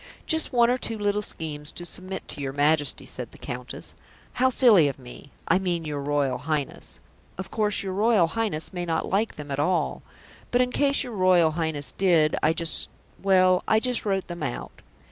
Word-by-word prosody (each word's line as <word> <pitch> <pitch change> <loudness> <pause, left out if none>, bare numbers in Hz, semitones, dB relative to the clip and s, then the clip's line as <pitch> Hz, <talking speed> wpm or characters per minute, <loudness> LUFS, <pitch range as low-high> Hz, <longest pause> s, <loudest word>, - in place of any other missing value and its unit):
"Just 320 -1 0
one 240 -2 +4
or 250 - 0
two 225 -2 -2
little 205 0 0
schemes 150 -6 -5
to 175 - -7
submit 185 +2 -6
to - - -6
your 135 -1 -3
Majesty," 145 +1 +1
said - - -7
the - - -14
Countess. - - -7 0.5
"How 260 - +5
silly 225 - +6
of 140 - -3
me 130 +2 -12 0.2
I 185 - +4
mean, 175 -3 -2
your 150 -2 -3
Royal 140 -3 0
Highness. 150 0 -4 0.4
Of 190 0 -6
course 210 -2 0
your 190 -1 -3
Royal 210 -2 +4
Highness 195 -3 -3
may 175 -1 -3
not 165 -2 -1
like 210 +4 0
them 145 -1 -8
at 135 - -2
all, 180 +5 0 0.5
but 245 - +2
in 250 0 +2
case 280 +1 +2
your 245 -3 -7
Royal 185 -4 +4
Highness 155 -3 -2
did, 170 -5 +3
I 155 - +4
just 165 0 0 0.3
well, 185 -1 +4
I 220 - +4
just 250 0 -1
wrote 195 -2 -1
them 175 -1 -7
out." 135 -5 -5
180 Hz, 195 wpm, -25 LUFS, 150-210 Hz, 0.5 s, silly